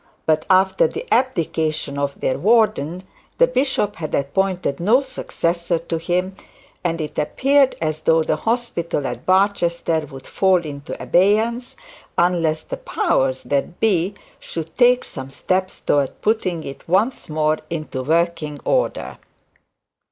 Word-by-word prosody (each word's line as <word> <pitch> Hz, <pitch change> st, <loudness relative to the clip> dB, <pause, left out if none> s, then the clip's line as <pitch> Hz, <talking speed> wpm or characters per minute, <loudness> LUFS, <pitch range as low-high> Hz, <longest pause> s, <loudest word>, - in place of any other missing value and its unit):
But 155 Hz, -1 st, +1 dB
after 190 Hz, -, +4 dB
the 465 Hz, +1 st, -6 dB
abdication 160 Hz, -, 0 dB
of 140 Hz, 0 st, -2 dB
their 130 Hz, -, 0 dB
warden, 205 Hz, -6 st, +2 dB, 0.3 s
the -, -, +6 dB
bishop 265 Hz, -, 0 dB
had 155 Hz, -2 st, -3 dB
appointed 175 Hz, +1 st, -1 dB
no 225 Hz, +10 st, +3 dB
successor 170 Hz, -9 st, -2 dB
to 165 Hz, 0 st, -4 dB
him, 180 Hz, +3 st, -1 dB, 0.5 s
and 170 Hz, -2 st, -1 dB
it 155 Hz, -1 st, -4 dB
appeared 275 Hz, -, +3 dB
as 155 Hz, -1 st, -2 dB
though 160 Hz, 0 st, +3 dB
the -, -, 0 dB
hospital 225 Hz, -, -2 dB
at -, -, -5 dB
Barchester 170 Hz, -5 st, +2 dB
would 135 Hz, -1 st, -11 dB
fall 185 Hz, -3 st, +2 dB
into 145 Hz, 0 st, -7 dB
abeyance, 220 Hz, +6 st, +2 dB, 0.4 s
unless 165 Hz, -3 st, +2 dB
the -, -, -6 dB
powers 130 Hz, 0 st, 0 dB
that 145 Hz, +5 st, -2 dB
be 195 Hz, -3 st, +1 dB, 0.2 s
should 165 Hz, -1 st, -7 dB
take 250 Hz, 0 st, +4 dB
some 135 Hz, -1 st, -8 dB
steps 185 Hz, +7 st, -2 dB
towards 140 Hz, -2 st, +1 dB
putting 185 Hz, -7 st, 0 dB
it 140 Hz, +3 st, -9 dB
once 205 Hz, +6 st, +1 dB
more 155 Hz, 0 st, +1 dB
into 155 Hz, -5 st, -4 dB
working 160 Hz, 0 st, 0 dB
order. -, -, -1 dB
170 Hz, 135 wpm, -21 LUFS, 155-210 Hz, 0.5 s, the